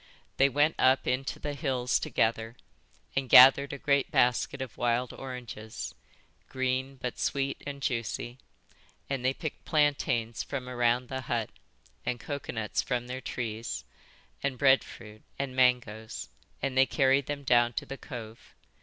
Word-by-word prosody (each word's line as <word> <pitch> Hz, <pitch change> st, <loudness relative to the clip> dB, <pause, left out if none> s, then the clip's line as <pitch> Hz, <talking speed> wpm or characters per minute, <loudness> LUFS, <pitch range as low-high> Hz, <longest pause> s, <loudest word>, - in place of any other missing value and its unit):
They 135 Hz, +1 st, +5 dB
went 145 Hz, +4 st, +3 dB
up 130 Hz, +1 st, +4 dB
into 130 Hz, +1 st, -1 dB
the 145 Hz, -, -4 dB
hills 130 Hz, -4 st, 0 dB
together 115 Hz, +1 st, 0 dB, 0.6 s
and 135 Hz, -2 st, -1 dB
gathered 135 Hz, +2 st, +8 dB
a 140 Hz, -, -5 dB
great 140 Hz, 0 st, +1 dB
basket 125 Hz, +2 st, +2 dB
of 130 Hz, -4 st, -6 dB
wild 120 Hz, +1 st, 0 dB
oranges, 120 Hz, -4 st, -7 dB, 0.6 s
green, 130 Hz, +1 st, -1 dB
but 125 Hz, -1 st, -5 dB
sweet 140 Hz, 0 st, -1 dB
and 140 Hz, -1 st, -6 dB
juicy; 120 Hz, 0 st, -3 dB, 0.7 s
and 135 Hz, -2 st, -1 dB
they 130 Hz, -, +3 dB
picked 155 Hz, -, -6 dB
plantains 140 Hz, -6 st, +1 dB
from 130 Hz, -3 st, -5 dB
around 120 Hz, 0 st, +1 dB
the 130 Hz, +1 st, -4 dB
hut, 115 Hz, -4 st, -2 dB, 0.5 s
and 120 Hz, -, -2 dB
coconuts 120 Hz, -6 st, -3 dB
from 125 Hz, -2 st, -2 dB
their 130 Hz, +1 st, -5 dB
trees, 115 Hz, -2 st, -4 dB, 0.6 s
and 140 Hz, -2 st, -1 dB
breadfruit 120 Hz, -5 st, +1 dB, 0.2 s
and 135 Hz, -2 st, -3 dB
mangoes; 120 Hz, -4 st, +1 dB, 0.3 s
and 135 Hz, -1 st, -1 dB
they 130 Hz, 0 st, +5 dB
carried 135 Hz, -1 st, +2 dB
them 145 Hz, -1 st, -4 dB
down 120 Hz, -2 st, +4 dB
to -, -, -3 dB
the 135 Hz, -, -8 dB
cove. 115 Hz, -4 st, -9 dB
130 Hz, 145 wpm, -29 LUFS, 120-135 Hz, 0.7 s, gathered